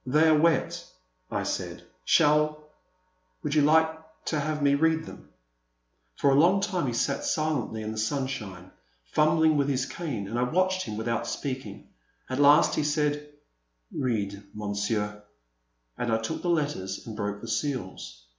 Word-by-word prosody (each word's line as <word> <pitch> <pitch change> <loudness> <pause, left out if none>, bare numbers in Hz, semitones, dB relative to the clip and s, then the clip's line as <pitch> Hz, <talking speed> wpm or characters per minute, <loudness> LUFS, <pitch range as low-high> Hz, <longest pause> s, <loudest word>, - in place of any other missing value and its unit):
They 150 +5 +3
are 155 - +6
wet, 165 +2 +2 0.5
I - - -2
said; - - -4 0.2
shall 150 +1 +4 0.4
— 185 0 -44
would 150 -2 -1
you 155 - +4
like 160 +2 +3 0.3
to 155 - 0
have 150 0 -2
me 140 0 +4
read 160 +2 +2
them? - - -12 0.9
For 140 - +3
a 135 - +5
long 180 +5 +5
time 190 -7 -1
he 120 - -1
sat 140 +4 0
silently 150 -8 -1
in 110 - -4
the 110 - -5
sunshine, 110 -7 -3 0.4
fumbling 155 0 +4
with 140 -1 +2
his 130 -2 0
cane, 130 - -4
and 115 +4 -2
I - - +1
watched 185 +7 +1
him 105 -2 -5
without 115 +1 -2
speaking. 130 -8 -5 0.4
At 130 - -1
last 145 +2 +6
he - - 0
said, 150 0 0 0.6
Read, 105 -6 -2
Monsieur," 105 0 -2 0.8
and 120 - -1
I 110 - +3
took 115 +8 -4
the 175 - -2
letters 145 - -1
and 110 - -7
broke 105 -1 -3
the 115 - -9
seals. 110 - -4
140 Hz, 165 wpm, -27 LUFS, 110-155 Hz, 0.9 s, are